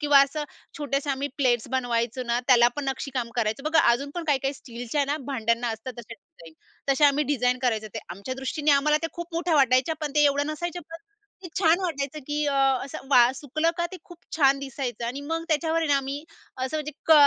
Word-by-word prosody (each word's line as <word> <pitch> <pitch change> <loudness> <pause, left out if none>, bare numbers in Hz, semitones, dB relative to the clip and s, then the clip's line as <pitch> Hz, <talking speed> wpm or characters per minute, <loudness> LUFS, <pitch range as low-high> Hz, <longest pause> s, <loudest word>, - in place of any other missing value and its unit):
किंवा 290 -2 +6
असं 295 +2 -2 0.3
छोट्याशा 280 0 -1
आम्ही 275 +2 -3
प्लेट्स 245 -5 +1
बनवायचो 245 -1 0
ना, 240 0 0
त्याला 240 -2 +6
पण 290 - -3
नक्षीकाम 265 -3 -3
करायचं 225 +3 0
बघा, 320 +1 +4
अजून 275 +4 0
पण 345 -1 -4
काही-काही 275 -2 0
स्टीलच्या 245 +3 -3
ना 290 +2 -1
भांड्यांना 235 -2 0
असतात 225 +3 -5
तसे 230 0 -9
डिझाईन. 230 - -17 0.4
तसे 290 +2 +4
आम्ही 290 +1 +4
डिझाइन 250 -2 +1
करायचं 220 -3 0
ते. - - -2
आमच्या 200 +9 -6
दृष्टीने 290 +3 -1
आम्हाला 295 +2 +4
त्या 330 - -2
खूप 345 0 -8
मोठ्या 335 -1 0
वाटायच्या, 260 +3 +3
पण 300 -2 -2
ते 295 -1 +5
एवढं 285 0 +2
नसायचं 345 +3 -4
पण 330 - -6 0.5
ते 355 - -7
छान 345 0 +4
वाटायचं, 305 -5 -3
की 295 0 -1
अ, 280 - 0 0.3
असं 270 0 -8
वा 245 -2 +7
सुकलं 310 +4 0
का 345 0 0
ते - - -5
खूप 350 -3 -14 0.2
छान 275 -2 +4
दिसायचं 265 -3 -4
आणि 265 +4 -4
मग 330 0 -1
त्याच्यावर 320 +1 +1
आहे 325 -2 0
ना 285 - +4
आम्ही, 275 +1 -3 0.3
असं 260 +4 -2
म्हणजे 300 0 -4
क 320 - +6
280 Hz, 210 wpm, -26 LUFS, 250-305 Hz, 0.5 s, वा